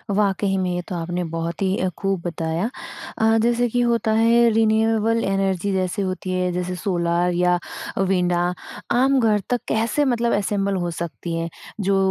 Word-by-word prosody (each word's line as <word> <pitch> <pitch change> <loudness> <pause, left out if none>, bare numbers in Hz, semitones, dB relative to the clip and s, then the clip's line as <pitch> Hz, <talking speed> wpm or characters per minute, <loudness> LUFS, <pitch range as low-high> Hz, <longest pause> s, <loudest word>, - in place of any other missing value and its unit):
वाक़ई 195 -1 +1
में 185 -1 0
ये 180 - -2
तो 180 - -4
आपने 175 +1 -2
बहुत 165 +2 -3
ही 190 0 +1
अ, 185 - 0
खूब 195 -2 -1
बताया। 170 +4 -2 0.5
अ, 225 0 +3
जैसे 240 +1 +2
कि 245 +2 +1
होता 235 -2 +1
है 235 +1 +5
रिन्यूएबल 225 +1 +2
एनर्जी 195 0 0
जैसे 185 +1 -1
होती 185 -1 -3
है 180 0 0
जैसे 180 0 -2
सोलर 175 -1 0
या 180 0 +2 0.4
विंड 180 -2 +1 0.5
आम 270 +1 +4
घर 220 -3 +3
तक 245 - +1
कैसे 225 +6 +1
मतलब 235 -2 +1
असेम्बल 200 -1 0
हो 175 - -2
सकती 170 0 -4
हैं? 165 0 -2 0.3
जो 195 0 +2
195 Hz, 170 wpm, -22 LUFS, 180-225 Hz, 0.5 s, है